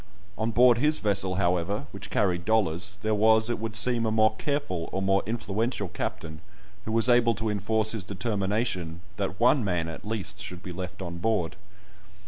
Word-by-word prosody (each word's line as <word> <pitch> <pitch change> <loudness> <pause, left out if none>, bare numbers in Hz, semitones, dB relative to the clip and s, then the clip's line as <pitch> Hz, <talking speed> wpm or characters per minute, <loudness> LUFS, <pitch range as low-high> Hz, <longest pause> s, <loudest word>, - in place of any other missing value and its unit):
On 110 +1 -1
board 120 +1 +5
his 150 +3 +3
vessel, 100 -3 0
however, 90 +1 0
which - - -8
carried 90 -3 +1
dollars, 95 -2 0
there 110 0 +1
was, 110 +2 +4
it 120 - -2
would 110 -1 -4
seem, 115 +2 +2
a - - 0
more 110 0 +3
careful, 115 - -2
or 95 - -2
more 95 0 +2
influential 110 -2 -2
captain, 80 -2 -5 0.4
who 110 - -3
was 115 +1 +4
able 120 -2 +4
to 110 -1 -2
enforce 110 +1 +1
his 110 -4 -2
determination 100 -3 -2 0.2
that 100 -1 -3
one 125 +2 +4
man, 90 -5 -1
at 80 - -7
least, 105 -2 -3
should 90 0 -7
be 90 - -6
left 90 +1 -6
on 85 -1 -6
board. 100 -4 0
105 Hz, 180 wpm, -27 LUFS, 90-110 Hz, 0.4 s, board